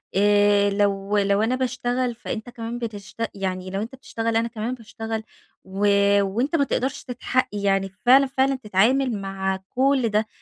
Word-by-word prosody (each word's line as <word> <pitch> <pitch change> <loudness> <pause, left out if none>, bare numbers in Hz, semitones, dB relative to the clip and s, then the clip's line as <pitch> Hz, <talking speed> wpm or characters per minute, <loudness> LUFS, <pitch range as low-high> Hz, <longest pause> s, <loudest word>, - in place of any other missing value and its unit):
آآ، 205 0 +4
لو 200 0 0
لو 200 +1 +2
أنا 235 +3 +1
باشتغل 250 -1 -1
فأنت 230 0 -6
كمان 235 0 -6
بتشت 225 0 -5
يعني 185 -1 -3
لو 195 +2 -3
أنت 235 +4 -6
بتشتغل 230 -3 -3
أنا 230 +1 +1
كمان 230 +1 -4
باشتغل 225 -1 -6 0.4
و 195 +2 -1 0.3
وأنت 235 - -1
ما 285 - +3
تقدرش 260 0 -2
تتحق 255 +1 -1
يعني 195 -1 0
فعلًا، 250 +8 +4
فعلًا 270 +1 +1
تتعامل 235 +1 +1
مع 190 0 -2
كل 265 -2 +2
ده. 215 +1 +1
225 Hz, 155 wpm, -23 LUFS, 200-250 Hz, 0.4 s, آآ